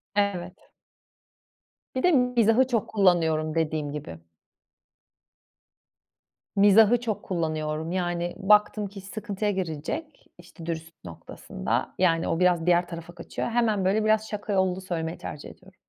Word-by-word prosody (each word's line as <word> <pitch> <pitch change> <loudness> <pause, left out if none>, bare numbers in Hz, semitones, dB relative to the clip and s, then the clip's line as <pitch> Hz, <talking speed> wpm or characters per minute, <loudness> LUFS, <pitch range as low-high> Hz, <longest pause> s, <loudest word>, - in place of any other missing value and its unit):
Evet. 190 -2 -2 1.3
Bir 255 - -1
de 360 - +5
mizahı 250 -3 +3
çok 230 -5 0
kullanıyorum, 165 -6 +2
dediğim 155 -2 -1
gibi. 85 - -7 2.4
Mizahı 210 +4 +6
çok 225 -4 -3
kullanıyorum. 155 -2 -2
Yani, 175 -1 -2
baktım 210 +1 +3
ki 195 0 -10
iş 190 - -12
sıkıntıya 210 -1 -3
girecek, 190 - -5
işte, 175 -1 -13
dürüstlük 165 0 -6
noktasında. 80 -6 -4
Yani, 165 -3 +2
o 165 - -1
biraz 180 -2 +3
diğer 175 0 +3
tarafa 170 0 -9
kaçıyor, - - -5
hemen, 225 -5 +1
böyle, 205 +3 +2
biraz 215 0 +2
şaka 210 0 -4
yollu 190 -1 +1
söylemeyi 165 -2 -4
tercih 150 - -8
ediyorum. 190 +1 -17
185 Hz, 130 wpm, -26 LUFS, 165-210 Hz, 2.4 s, Mizahı